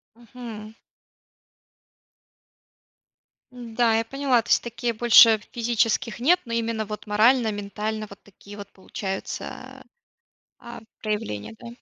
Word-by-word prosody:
Мгм. 225 -2 -10 2.8
М, 240 -2 -10
да, 235 -2 +3
я 225 - 0
поняла. 265 -1 +1
То - - -16
есть - - +4
такие 235 0 -3
больше 225 -1 +6
физических 230 -1 0
нет, 340 +9 +4
но 230 - -8
именно 230 -1 -1
вот 210 +1 -7
морально, 225 +3 +3
ментально 210 +1 -4
вот 200 - -14
такие 205 +1 -14
вот 200 -1 -9
получаются, 190 0 -7 0.7
а, 235 - -10
а, - - -11 0.2
проявления, 110 - -4
да? - - -10
225 Hz, 120 wpm, -24 LUFS, 210-235 Hz, 2.8 s, больше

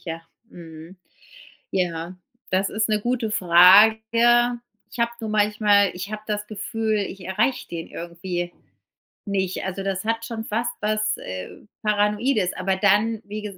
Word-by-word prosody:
Ja, 165 -1 -6 0.3
mhm. 165 +1 -12 0.8
Ja, 175 -1 -2 0.4
das 190 +1 +1
ist 220 +1 -1
'ne 215 -1 +2
gute 240 -1 -1
Frage. 220 +7 +5 0.3
Ich - - -10
hab 235 0 -1
nur 220 - -4
manchmal 210 -1 +3
ich 185 +3 -7
hab 215 0 -6
das 210 -1 -3
Gefühl, 220 +1 -2
ich 195 -1 -5
erreich 210 +8 0
den 165 -1 -6
irgendwie 175 +1 -5 0.7
nicht. 190 -3 -2
Also 190 +1 -4
das 195 0 -3
hat 225 0 -1
schon 225 -2 -6
fast 235 +3 -1
was, 215 0 0
äh, 95 0 -7 0.3
Paranoides, 210 0 +1
aber 190 +1 -1
dann, 210 +3 +2
wie 210 +1 -6
gesa 205 -2 -8
210 Hz, 145 wpm, -23 LUFS, 185-220 Hz, 0.8 s, Frage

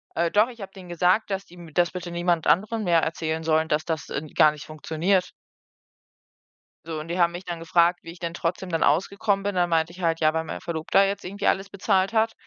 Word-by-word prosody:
Äh, 170 0 +1
doch, 215 +4 +4
ich 235 -3 -12
habe 195 0 -7
denen 185 -3 -12
gesagt, 180 +6 +2
dass 195 0 -3
die 175 - -19
m 170 -3 -12
das 175 0 +2
bitte 180 -1 -6
niemand 175 -1 0
anderem 215 +4 +2
mehr 170 -3 +3
erzählen 160 0 -2
sollen, 160 0 +2
dass 150 0 0
das, 160 -2 -3
ähm, 155 +1 -4
gar 155 -2 +6
nicht 150 0 -10
funktioniert. 165 +4 -1 1.5
So, 165 -1 -5
und 160 +2 -8
die 175 - -2
haben 170 -1 +3
mich 175 +2 -7
dann 170 -2 -5
gefragt, 170 +1 +2
wie 165 - -8
ich 170 - -14
denn 170 -1 -4
trotzdem 175 +2 -3
dann 165 -2 0
ausgekommen 195 +6 +1
bin. 205 -1 -2
Dann 175 -1 +2
meinte 165 0 +1
ich 185 - -12
halt: 165 -1 +1
„Ja, 155 0 +4
weil 160 0 -1
meine - - -6
Verlobter 170 +4 +2
jetzt 200 0 -3
irgendwie 200 +2 -3
alles 195 +1 +1
bezahlt 195 +1 +1
hat“, 225 0 +2
175 Hz, 235 wpm, -25 LUFS, 165-195 Hz, 1.5 s, gar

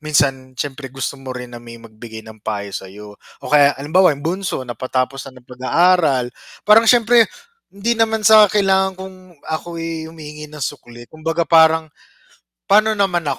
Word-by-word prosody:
minsan 135 -4 -1
siyempre 135 +1 -5
gusto 135 +1 -6
mo 130 -1 -7
rin 125 -1 -9
na 120 - -9
may 115 0 -12
magbigay 110 -1 -12
ng 110 -1 -14
payo 100 -2 -5
sa'yo. 100 +3 -9 0.4
O - - -7
kaya 145 -1 +5
halimbawa 155 +3 +2
yung 145 - -12
bunso 175 -5 -3
napatapos 130 +2 -3
na 130 - -16
ng 125 -1 -17
pag-aaral 150 +1 +2 0.4
parang 220 +1 +5
siyempre 235 -1 +5 0.4
hindi 200 +4 -1
naman 225 -1 +1
sa 215 -1 +8
kailangan 190 -2 +2
kung 190 0 -9 0.3
ako, 165 +2 -5
eh, 165 -1 -5
humihingi 150 -2 -10
ng 150 0 -12
sukli. 120 -1 -7
Kumbaga 165 +2 -3
parang, 160 0 +4 0.8
"Paano 215 +2 +4
naman 190 -5 0
150 Hz, 160 wpm, -18 LUFS, 130-185 Hz, 0.8 s, sa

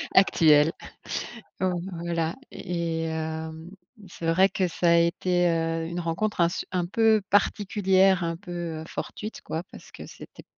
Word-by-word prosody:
actuel. 160 -4 +5 0.9
Heu, 185 -1 +1 0.3
voilà 170 -1 -1 0.2
et 170 -2 -3
hem, 160 +1 -5 0.4
c'est 170 - -8
vrai 185 +4 +4
que 185 -2 0
ça 170 0 0
a - - +6
été, 175 +1 +2
heu, 165 0 -1
une 170 +1 -4
rencontre 175 +4 -1
un 170 - +4
se - - -4
un 180 -2 0
peu 220 +3 +3
particulière, 195 -2 +3
un 165 0 -1
peu, 180 0 -11 0.3
heu, - - -7
fortuite, 215 +1 -6
quoi, 160 +2 -4
parce - - -13
que - - -10
c'était - - -13
170 Hz, 155 wpm, -26 LUFS, 165-185 Hz, 0.9 s, a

